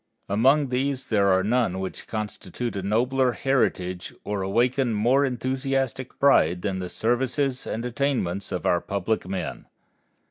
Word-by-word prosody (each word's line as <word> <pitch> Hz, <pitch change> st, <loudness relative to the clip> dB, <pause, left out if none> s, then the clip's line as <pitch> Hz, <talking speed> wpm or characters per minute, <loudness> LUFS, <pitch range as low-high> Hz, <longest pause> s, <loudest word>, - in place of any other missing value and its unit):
Among 135 Hz, +8 st, +3 dB
these 130 Hz, +1 st, -1 dB
there 100 Hz, -3 st, +3 dB
are 95 Hz, -1 st, +4 dB
none 110 Hz, -3 st, +1 dB
which 95 Hz, 0 st, -5 dB
constitute 110 Hz, +1 st, -4 dB
a 100 Hz, -, -2 dB
nobler 125 Hz, +6 st, +1 dB
heritage 95 Hz, -10 st, 0 dB
or 100 Hz, -1 st, -2 dB
awaken 120 Hz, +5 st, +1 dB
more 125 Hz, +7 st, +3 dB
enthusiastic 130 Hz, 0 st, -2 dB
pride 90 Hz, -, +4 dB
than 95 Hz, -3 st, -1 dB
the 90 Hz, -1 st, -4 dB
services 130 Hz, +4 st, 0 dB
and 115 Hz, +2 st, -3 dB
attainments 120 Hz, -8 st, -1 dB
of 90 Hz, -, -3 dB
our 85 Hz, -, +3 dB
public 100 Hz, 0 st, -2 dB
men. 95 Hz, 0 st, -4 dB
115 Hz, 140 wpm, -25 LUFS, 95-130 Hz, -, are